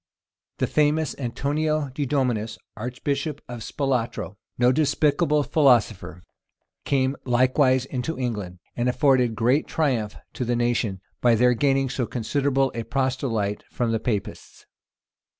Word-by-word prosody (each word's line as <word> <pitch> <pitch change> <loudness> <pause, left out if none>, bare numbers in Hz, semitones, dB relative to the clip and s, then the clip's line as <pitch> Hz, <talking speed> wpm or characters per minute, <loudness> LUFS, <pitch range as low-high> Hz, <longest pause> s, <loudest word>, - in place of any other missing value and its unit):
[] - - -65
The - - +1
famous 150 0 +1
Antonio 145 +4 -1
di 140 +2 -3
Dominis, 120 -5 0 0.2
archbishop 140 +5 -3
of 120 -1 -7
Spalatro, 125 -5 -2 0.2
no 125 +1 +4
despicable 145 +1 +2
philosopher, 115 - +2 0.6
came 135 0 +1
likewise 130 +1 +3
into 135 +5 -4
England, 105 -8 -3 0.2
and 120 +1 0
afforded 125 -2 +3
great 125 +6 +2
triumph 125 -10 0 0.2
to - - -3
the 120 0 0
nation, 120 -5 0 0.2
by 120 -1 +5
their 125 +2 +4
gaining 135 +2 +2
so 125 -2 -2
considerable 135 +3 0
a 115 - -3
proselyte 125 -5 -1
from 120 -2 -1
the 115 - 0
Papists. 105 -3 -4
125 Hz, 130 wpm, -24 LUFS, 115-140 Hz, 0.6 s, by